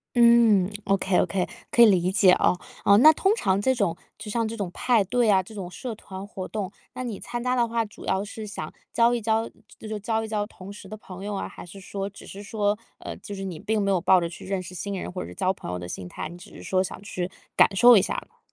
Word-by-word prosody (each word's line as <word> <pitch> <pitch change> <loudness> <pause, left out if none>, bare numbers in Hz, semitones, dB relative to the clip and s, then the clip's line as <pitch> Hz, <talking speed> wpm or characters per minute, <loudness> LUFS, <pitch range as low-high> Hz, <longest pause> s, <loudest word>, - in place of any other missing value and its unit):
嗯。 235 -5 +6
OK 195 -2 +1
OK， 180 +1 0 0.2
可 235 - +6
以 235 - +10
理 185 -3 +3
解 190 -1 +5
哦。 180 - +3 0.3
哦， 200 0 +6
那 310 +7 +9
通 385 +6 +2
常 190 - +1
这 260 +5 +2
种 200 -8 0 0.2
就 215 -1 -7
像 230 0 0
这 225 +1 -5
种 195 -5 -3
派 235 -5 +2
对 235 +2 +2
啊、 190 -1 +4
这 220 +4 -13
种 185 -4 -6
社 235 +6 -6
团 195 -2 -9
活 190 -2 -7
动， 205 -3 -4 0.2
那 255 - -5
你 230 -5 -5
参 240 0 -5
加 250 0 +1
的 240 -2 +2
话， 230 0 0
主 205 - -13
要 190 +2 0
是 215 +1 -7
想 155 -7 -6 0.2
交 235 +1 +4
一 235 - -1
交 220 +1 0 0.3
就 220 - -10
是 215 -1 -4
交 225 +2 -1
一 - - -6
交 210 -1 -1
同 195 -2 -11
识 205 - -12
的 215 - -7
朋 190 -2 -10
友 205 0 -3
啊， - - -3
还 - - -11
是 180 +3 -12
说 195 +1 -4
只 200 - -13
是 200 +1 -9
说， 205 0 0 0.2
呃 - - -7
就 205 - -8
是 195 - -5
你 180 -5 -5
并 220 0 0
没 200 0 +1
有 185 - +2
抱 185 +1 +5
着 170 - -2
去 170 - -11
认 190 -1 -2
识 180 0 -10
新 200 +2 -4
人 - - -5
或 180 - -4
者 - - -7
是 - - -10
交 190 -1 +1
朋 135 - -8
友 90 - -3
的 90 - -7
心 90 0 -6
态， - - -6
你 170 - -10
只 175 - -14
是 - - -10
说 185 0 +1
想 190 - -6
去 185 -2 -4 0.3
感 - - +5
受 240 +2 +8
一 190 - +5
下 - - -2
呢。 - - -34
200 Hz, 300 characters per minute, -25 LUFS, 185-225 Hz, 0.3 s, 以